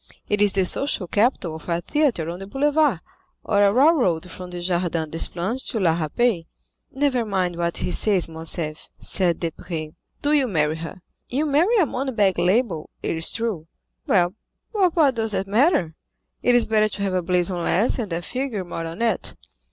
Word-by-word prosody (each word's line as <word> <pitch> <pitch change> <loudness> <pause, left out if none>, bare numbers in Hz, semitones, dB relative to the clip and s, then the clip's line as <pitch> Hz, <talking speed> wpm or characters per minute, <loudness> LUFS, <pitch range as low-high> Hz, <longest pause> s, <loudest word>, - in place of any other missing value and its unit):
"It 205 0 0
is 205 -1 +4
the 190 -2 +2
social 245 -1 0
capital 205 -3 +1
of 160 - -12
a 170 0 +1
theatre 245 - 0
on 175 - -7
the 195 - -8
boulevard, 285 - +2 0.4
or 205 -1 +2
a 200 - +5
railroad 240 - +3
from 180 +1 -8
the 180 0 -6
Jardin 175 -3 -1
des 165 - 0
Plantes 195 +9 -2
to 225 - -1
La 170 -4 +3
Râpée." 170 +2 0 0.4
"Never 270 -3 +1
mind 190 -5 -1
what 170 0 -2
he - - -2
says, 195 -3 +3
Morcerf," 160 -1 -4
said 180 -4 0
Debray, 165 -2 -4 0.3
"do 290 +1 +2
you 280 -3 +3
marry 155 -6 0
her. 170 +3 -8 0.3
You 280 +5 0
marry 325 +11 +3
a 375 - +5
money 265 -1 -3
bag 200 -5 +2
label, 180 -2 +1
it - - -1
is 160 0 +1
true; 215 -9 -2 0.4
well, 175 0 +3 0.4
but 375 -5 +2
what 295 -6 +4
does 225 -2 -1
that 195 - 0
matter? 210 - +2 0.5
It 245 - +3
is 240 - +5
better 215 -1 +2
to - - -6
have 195 -2 -1
a 185 - +1
blazon 180 0 0
less 205 +11 +1
and 215 -6 -3
a 170 +1 -2
figure 250 -5 -3
more 165 -2 -5
on 170 +8 -4
it. 230 - 0
195 Hz, 190 wpm, -23 LUFS, 170-245 Hz, 0.5 s, a